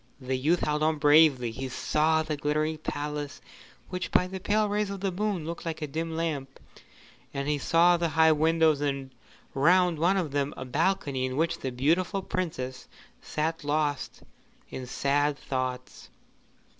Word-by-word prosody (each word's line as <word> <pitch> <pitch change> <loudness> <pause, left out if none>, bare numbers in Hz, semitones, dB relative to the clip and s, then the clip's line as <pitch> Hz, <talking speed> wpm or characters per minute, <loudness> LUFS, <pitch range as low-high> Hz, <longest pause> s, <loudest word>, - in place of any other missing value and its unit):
The 130 -1 -2
youth 155 +7 +1
held 150 0 0
on 155 0 +2
bravely. 145 -5 +5
He 130 +3 -5
saw 160 +4 +1
the 155 -1 -3
glittering 155 +2 -1
palace, 145 -1 -4 0.5
which 180 -1 -4
by 180 - +3
the 190 +1 -6
pale 210 +3 +1
rays 205 0 -1
of 200 -1 -5
the 195 -1 0
moon 195 -3 -2
looked 170 +1 -5
like 165 -2 -4
a - - 0
dim 160 +3 -4
lamp; 145 -5 -3 0.8
and 140 0 -2
he 150 -1 0
saw 175 +4 +4
the 170 -1 0
high 160 0 +5
windows, 160 -1 +3
and 135 -2 -2 0.4
round 175 +3 +3
one 180 +4 +3
of 170 -7 -1
them 140 +1 -1
a 130 - -5
balcony 140 -1 0
in 130 +1 -5
which 170 +2 0
the 130 - -3
beautiful 170 +10 +1
Princess 130 -10 -4 0.3
sat 160 +1 -2
lost 145 -1 -1 0.5
in 130 -1 -6
sad 145 +3 +1
thoughts. 130 -2 -4
155 Hz, 165 wpm, -28 LUFS, 140-170 Hz, 0.8 s, bravely